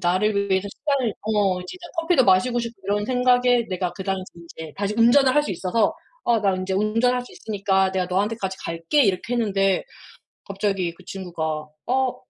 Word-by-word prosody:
나를 200 +3 +1
위해서 190 +1 +1
시간을 275 -1 -1
어 205 -4 +1
진짜 360 - -9
커피도 330 -5 +3
마시고 235 +6 +3
싶고 235 -3 -7
이런 205 +1 0
생각에 245 0 +3
내가 180 -2 -2
그 190 - -8
당시에 190 -1 -1
인제 160 -2 -10
다시 205 +1 -2
운전을 255 +4 +5
할 295 - +4
수 - - -4
있어서 190 +4 +1 0.3
"어 235 -1 +2
나 195 -2 +2
이제 185 +1 -3
운전할 230 +5 +1
수 - - -14
있으니까 195 -3 0
내가 185 -1 -1
너한테까지 195 +1 -1
갈게." 165 - +1
이렇게 195 +1 0
했는데 195 -5 +1 0.6
갑자기 195 -3 -2
그 - - -18
친구가 160 -5 -4 0.2
어. 260 +1 +1
200 Hz, 375 characters per minute, -23 LUFS, 185-240 Hz, 0.6 s, 운전을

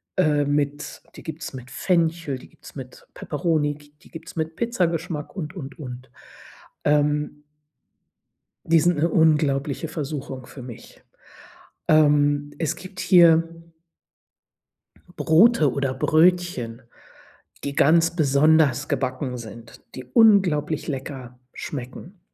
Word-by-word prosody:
Äh, 150 -6 +2
mit 145 0 -2
die - - -12
gibt 160 0 -7
es - - -6
mit 125 -1 -9
Fenchel, 165 -4 0
die - - -14
gibt - - -29
es - - -12
mit 130 -2 -10
Peperoni, 150 -1 -1
g 145 0 -19
die - - -19
gibt 165 0 -10
es - - -12
mit 160 0 -3
Pizzageschmack 170 -8 -2
und, 170 -1 -6
und, 145 -2 -8
und. 125 -3 -9 0.8
Ähm 150 0 +1 1.2
Die 165 0 +4
sind 175 +1 +2
'ne 165 +3 +2
unglaubliche 150 -2 +1
Versuchung 140 -4 -6
für 135 - -11
mich. 120 -2 -12 0.9
Ähm, 145 -1 +3
es 160 - -2
gibt 185 +1 -10
hier 165 -1 +4 1.5
Brote 160 - +4
oder 140 -2 -1
Brötchen, 160 -8 +1 0.8
die 140 - -3
ganz 165 +3 +3
besonders 145 -2 +3
gebacken 130 -1 -2
sind, 115 0 -11 0.2
die 130 - -7
unglaublich 165 - +3
lecker 130 -3 -6
schmecken. 145 +8 -8
150 Hz, 120 wpm, -23 LUFS, 140-165 Hz, 1.5 s, Die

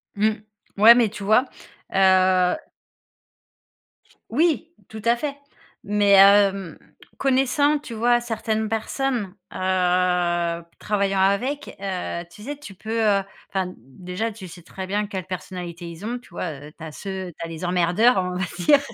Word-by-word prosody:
Mmh, 215 +2 +3 0.5
ouais, 225 +4 +9
mais 235 -3 +3
tu 205 -1 -8
vois? 215 +6 +4 0.5
Heu 185 -1 +4 1.7
Oui, 325 +5 +1 0.2
tout 220 0 -8
à 235 +1 +4
fait 280 +3 -4 0.5
mais 205 -1 +3
hem, 195 -3 +5 0.4
connaissant, 275 +3 +2
tu 255 - -9
vois, 240 +2 +3
certaines 220 -2 -2
personnes, 225 -1 -2 0.2
heu, - - -12 1.2
travaillant 200 -2 0
avec, 250 +10 0
heu, 185 -3 -3
tu 190 - -15
sais? 290 +4 -5
Tu 290 -9 -10
peux 220 +4 -4 0.5
enfin, 185 -2 -2
déjà, 180 - -5
tu 200 -3 -10
sais 175 +1 -12
très 190 +2 -7
bien 205 +2 0
quelle 190 -3 -5
personnalité 180 -2 -6
ils 170 +3 -10
ont, 240 +2 -2
tu - - -20
vois? 150 -4 -6
Tu 160 - -14
as 160 - -7
ceux 190 +1 -6
tu - - -4
as - - -6
les 165 +1 -8
emmerdeurs, 180 +7 +3
on 180 -1 0
va 185 - -1 0.2
dire 280 +11 +5
200 Hz, 150 wpm, -23 LUFS, 180-235 Hz, 1.7 s, ouais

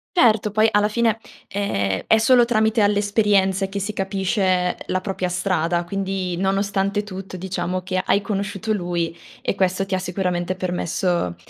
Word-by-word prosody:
Certo, 220 - +4
poi 215 +2 +3
alla 210 0 +3
fine, 225 0 +1 0.3
ehm, 100 - -1
è 220 - +5
solo 240 +2 +5
tramite 220 -1 +2
alle 205 0 +3
esperienze 200 -2 +2
che 200 +1 -3
si 205 +2 -3
capisce 190 -2 0
la 185 - 0
propria 185 -2 -3
strada, 175 -2 0
quindi 190 -1 -3
nonostante 195 +1 0
tutto 190 -2 -8
diciamo 185 0 -3
che 185 0 -1
hai 200 - +2
conosciuto 205 +1 -2
lui 175 -3 -2 0.3
e - - 0
questo 190 0 0
ti 195 - -5
ha 185 - +1
sicuramente 180 -1 -2
permesso, 175 - -1
195 Hz, 155 wpm, -22 LUFS, 180-205 Hz, 0.3 s, è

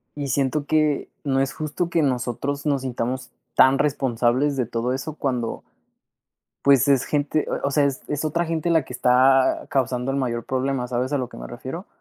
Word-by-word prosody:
y 145 -1 -4
siento 140 +2 0
que 155 -1 +1 0.2
no 135 -2 +1
es 135 +1 0
justo 155 +3 -3
que 170 -1 +1
nosotros 135 +2 -2
nos 140 -3 +1
sintamos 125 0 -3 0.2
tan 135 +1 +6
responsables 135 0 +1
de 125 - +1
todo 115 +2 -2
eso 135 +4 -4
cuando, 125 -6 -2 1.0
pues, 140 -1 +5
es 135 -2 +4
gente, 150 +1 0
o - - -1
eh - - -6
o 140 - +1
sea, 145 +1 +3
es 140 -2 -3
es 145 +1 -2
otra 170 +3 0
gente 165 0 -2
la 160 -4 +3
que - - -10
está 130 +1 +3
causando 130 -1 0
el 135 - -1
mayor 120 -3 -2
problema, 130 -1 -1
¿sabes 125 +1 -1
a - - +1
lo 125 -2 -3
que - - -11
me - - -7
refiero? - - -7
135 Hz, 200 wpm, -23 LUFS, 125-145 Hz, 1.0 s, tan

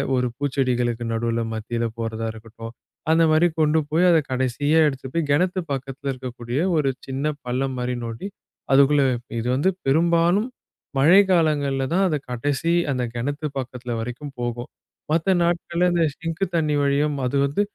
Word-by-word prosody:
ஒரு 125 0 +1
பூச்செடிகளுக்கு 125 -4 0
நடுவுல 115 0 -1
மத்தியில 115 +2 -3
போறதா 115 0 -3
இருக்கட்டும், 115 +1 -10 0.4
அந்த 165 +1 +5
மாரி 160 +3 +5
கொண்டு 155 0 +3
போய் 165 +4 +3
அத 165 - +5
கடைசியா 130 +4 +1
எடுத்துட்டு 130 -2 -5
போயி, 165 -2 +1
கெணத்து 180 +5 +2
பக்கத்துல 135 +1 -4
இருக்கக்கூடிய 125 0 -5 0.2
ஒரு 145 -3 +2 0.2
சின்னப் 140 +2 -2
பள்ளம் 130 +2 -1
மாரி 125 0 -2
நோண்டி 115 +10 -5 0.5
அதுக்குள்ள 140 +1 +5 0.4
இது 115 - -3
வந்து 145 +8 +2 0.2
பெரும்பாலும் 170 - +3 0.5
மழை 165 +9 +7
காலங்கள்ல 145 -6 +2
தான் 190 +3 +3
அது 155 -4 0
கடைசி, 145 +7 0 0.2
அந்தக் 125 -3 -2
கிணத்து 145 +6 -3
பக்கத்துல 125 -2 -5
வரைக்கும் 125 +5 -6
போகும். 120 0 -3 0.4
மத்த 165 +4 +2
நாட்கள்ல 170 +1 +1
அந்த 170 -1 +2
ஸிங்க் 165 +2 -4
தண்ணி 155 -3 +1
வழியும், 145 +1 +1
அது 125 - -1
வந்து 140 +8 0
140 Hz, 150 wpm, -23 LUFS, 125-160 Hz, 0.5 s, மழை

